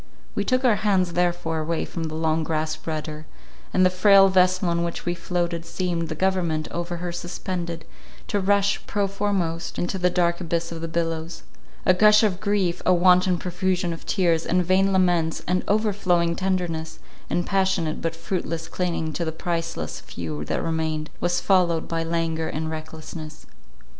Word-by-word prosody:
We - - -1
took 255 0 +1
our 225 -4 +4
hands 190 -5 +1
therefore 175 -2 0
away 160 +1 -1
from 165 -2 -5
the 155 0 -5
long 160 0 +1
grasped 155 0 -2
rudder; 155 -1 -4 0.4
and 185 - +4
the 185 - +4
frail 195 +1 +6
vessel 185 0 +3
on 170 0 +1
which 170 0 -4
we 175 - 0
floated, 170 -1 -2
seemed, 170 -2 -2
the 155 - -3
government 170 -3 0
over 175 0 -3
her 175 0 -4
suspended, 175 -1 -4 0.4
to 205 - 0
rush, 200 +1 +2
prow 205 -1 0
foremost, 190 -4 -2
into 180 +2 -2
the 180 0 +3
dark 175 0 +1
abyss 170 -1 -2
of 165 -1 -6
the 165 - -3
billows. 165 0 -3 0.4
A 185 - +6
gush 210 +3 +6
of 195 -4 +1
grief, 195 -4 0
a - - +3
wanton 180 0 +5
profusion 180 0 -1
of 165 - -10
tears, 170 -4 +2
and 180 0 +1
vain 190 +2 +3
laments, 175 -4 +2
and 180 +1 +1
overflowing 190 -5 +2
tenderness, 175 -4 -2 0.3
and 175 - 0
passionate 190 -5 0
but 165 0 -2
fruitless 165 -1 -3
clinging 170 -3 -2
to 170 - -2
the 160 - -2
priceless 165 0 -3
few 80 -3 -6
that - - -2
remained, 160 -1 -2
was 175 0 +1
followed 175 -4 +2
by 165 -1 -1
languor 165 -1 -1
and 160 +1 -3
recklessness. 155 0 -8
175 Hz, 170 wpm, -24 LUFS, 165-185 Hz, 0.4 s, frail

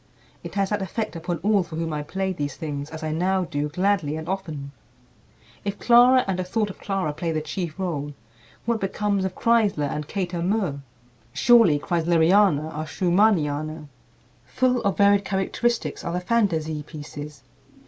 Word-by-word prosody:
It - - -8
has 195 0 0
that 210 -1 0
effect 215 +2 -3
upon 170 +1 -3
all 205 -1 +3
for 170 -2 -7
whom 165 -1 -2
I 150 - -2
play 190 +5 -2
these 145 -4 -4
things, 145 -3 -5
as 160 0 -8
I 155 - -2
now 185 +4 +1
do 150 -3 -2
gladly 180 -2 0
and 160 +1 -6
often." 160 -8 -4 0.9
If 200 0 -3
Clara 245 +2 +6
and 190 -1 -1
a - - 0
thought 205 +3 -1
of - - -15
Clara 195 -6 -2
play 165 +2 -3
the 155 - 0
chief 165 +1 -5
rôle, 145 -6 -3 0.5
what 235 -1 0
becomes 200 0 0
of 190 - -3
Kreisler 215 -10 +2
and 150 +1 -4
Kater 175 -2 -3
Murr? 185 -6 0 0.5
Surely 230 -11 +5
"Kreisleriana" 165 0 +3
are 155 +1 -4
Schumanniana. 155 -6 +1 0.6
Full 255 - +1
of 200 -3 0
varied 200 0 +5
characteristics 200 +5 -1
are 170 - -3
the 180 - 0
"Fantasie 170 -7 0
Pieces." 145 -1 -9
180 Hz, 165 wpm, -24 LUFS, 155-200 Hz, 0.9 s, Clara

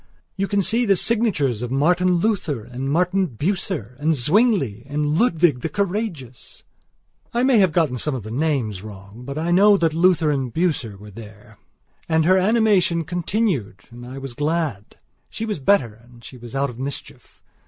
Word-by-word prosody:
You 195 - -1
can 200 -1 +1
see 230 +6 +1
the 200 -4 +3
signatures 180 - 0
of 120 - -4
Martin 175 +7 +2
Luther, 170 - -1
and 130 +4 -5
Martin 180 +4 +1
Bucer, 150 - -3
and 155 +2 +1
Zwingli, 150 - +1
and 150 +1 -1
Ludwig 165 - +2
the 165 - -2
Courageous...." 185 - -4 0.7
I 240 - +2
may 260 -4 +4
have 190 -4 +4
got 155 -5 +1
some 150 +1 -2
of 125 - -6
the 110 - -8
names 125 -8 -1
wrong, 105 +3 -11
but 140 +2 -6
I 165 +2 -1
know 200 +3 +6
that 165 -4 +1
Luther 170 -2 +3
and 135 -4 -2
Bucer 145 - -1
were 105 +1 -12
there. 105 0 -13 0.5
And 160 -1 +2
her 185 +2 +4
animation 195 -5 +2
continued 170 - -2
and 120 +1 -11
I 125 +2 -9
was 135 -2 -7
glad. 150 - -3 0.3
She 225 - -5
was 210 -7 -3
better 135 - +2
and 120 -1 -19
she 130 - -11
was 120 +1 -10
out 140 -1 0
of 120 - -13
mischief. 140 +1 -7
155 Hz, 175 wpm, -21 LUFS, 125-185 Hz, 0.7 s, know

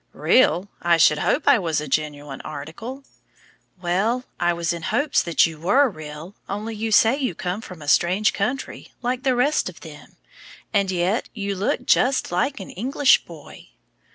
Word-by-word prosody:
"Real! 200 -7 +3
I 170 -1 +3
should 150 -2 +4
hope 290 - 0
I 245 - +6
was 165 -5 -1
a 150 - -5
genuine 145 -1 -3
article." 165 - -8 0.8
"Well, 195 +8 0 0.2
I 175 0 +2
was 170 0 -1
in 170 - -6
hopes 285 - +1
that 170 -1 +3
you 160 -2 -6
were 255 - +3
real, 155 0 -9 0.2
only 210 +3 -4
you 220 +1 -3
say 225 +4 +5
you 255 - -2
come 180 +5 -4
from 180 -7 -10
a - - -11
strange 185 +7 +3
country, 250 +7 -4
like 250 +1 -1
the 260 -1 +1
rest 285 +5 +1
of - - -14
them, - - -13 0.6
and 200 -2 +2
yet 185 +5 0
you 200 -2 -3
look 205 +6 -1
just 260 -4 +2
like 265 +10 0
an 190 - -8
English 265 +7 +2
boy." - - -13
195 Hz, 175 wpm, -22 LUFS, 170-245 Hz, 0.8 s, I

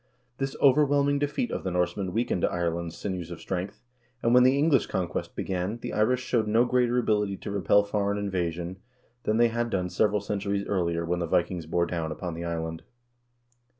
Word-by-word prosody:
This 135 0 -2
overwhelming 145 0 +4
defeat 145 - -1
of - - -3
the 95 - -1
Norsemen 90 +2 -1
weak 115 +6 -1
ened 90 - -1
Ireland's 85 -1 -2
sinews 90 -4 -4
of 85 - -7
strength, 95 +2 -4 0.4
and, 115 - +3
when 125 - +7
the 130 +2 +5
English 145 -4 +3
conquest 90 -2 -3
began, 95 +4 -2
the - - -6
Irish 125 +4 +2
showed 115 -4 0
no 115 +3 +4
greater 125 -1 +2
ability 105 -4 +1
to - - -6
repel 100 +1 +3
foreign 100 0 -1
invasion 90 -3 -2 0.5
than 110 - +2
they 120 0 +5
had 120 +1 -1
done 90 -4 -1
several 105 -1 +2
centuries 100 0 -2
earlier 85 -3 0
when 85 +1 -1
the 85 - -1
Vikings 85 0 0
bore 85 +1 +1
down 85 -2 -3
upon 85 +2 -5
the 85 +1 -5
island. 80 -1 -3
100 Hz, 185 wpm, -27 LUFS, 85-120 Hz, 0.5 s, when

